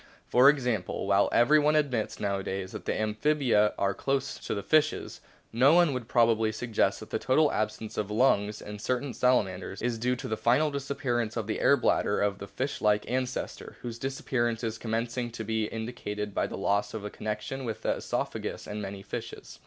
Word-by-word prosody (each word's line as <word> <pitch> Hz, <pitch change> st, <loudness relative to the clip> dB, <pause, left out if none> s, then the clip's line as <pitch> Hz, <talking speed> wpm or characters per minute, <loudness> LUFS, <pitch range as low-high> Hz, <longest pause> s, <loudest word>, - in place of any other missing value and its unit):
For 125 Hz, +3 st, +6 dB
example, 125 Hz, -11 st, 0 dB
while 100 Hz, 0 st, +3 dB
everyone 150 Hz, +5 st, +4 dB
admits 130 Hz, -8 st, 0 dB
nowadays 95 Hz, -1 st, -2 dB
that -, -, -8 dB
the -, -, -1 dB
Amphibia 110 Hz, 0 st, +2 dB
are 100 Hz, 0 st, +1 dB
close 135 Hz, +5 st, -2 dB
to -, -, -3 dB
the 100 Hz, -, -4 dB
fishes, 155 Hz, 0 st, +1 dB, 0.3 s
no 135 Hz, +7 st, +5 dB
one 175 Hz, -5 st, +5 dB
would 125 Hz, -3 st, -4 dB
prob 120 Hz, -2 st, +4 dB
ably 110 Hz, -1 st, +2 dB
suggest 110 Hz, 0 st, 0 dB
that -, -, -11 dB
the -, -, -1 dB
total 150 Hz, +3 st, +3 dB
absence 110 Hz, 0 st, -3 dB
of 105 Hz, -1 st, -2 dB
lungs 105 Hz, -2 st, +2 dB
in 105 Hz, 0 st, -7 dB
certain 125 Hz, +4 st, -2 dB
Salamanders 95 Hz, -7 st, +1 dB
is 120 Hz, -1 st, -1 dB
due 125 Hz, +2 st, +1 dB
to 125 Hz, -, -6 dB
the 110 Hz, -, -1 dB
final 135 Hz, +8 st, +2 dB
disappearance 125 Hz, -5 st, -2 dB
of 115 Hz, -, -1 dB
the 110 Hz, -, -2 dB
air -, -, +5 dB
bladder -, -, +1 dB
of 100 Hz, 0 st, 0 dB
the 100 Hz, -, -7 dB
fish 130 Hz, +7 st, -4 dB
like 105 Hz, 0 st, +2 dB
ancestor, 130 Hz, +1 st, -3 dB
whose 115 Hz, -1 st, -5 dB
disappearance 120 Hz, -3 st, -1 dB
is 115 Hz, 0 st, -3 dB
commencing 120 Hz, +2 st, -2 dB
to 115 Hz, -1 st, -6 dB
be 110 Hz, 0 st, -1 dB
indicated 105 Hz, -2 st, -5 dB
by -, -, 0 dB
the -, -, -6 dB
loss 100 Hz, +2 st, 0 dB
of 105 Hz, -2 st, -5 dB
a 105 Hz, -, -5 dB
connection 105 Hz, +5 st, -4 dB
with 115 Hz, -3 st, -5 dB
the -, -, +1 dB
oesophagus -, -, -3 dB
in 105 Hz, 0 st, -5 dB
many 100 Hz, -1 st, -6 dB
fishes. -, -, -7 dB
115 Hz, 190 wpm, -28 LUFS, 105-130 Hz, 0.3 s, For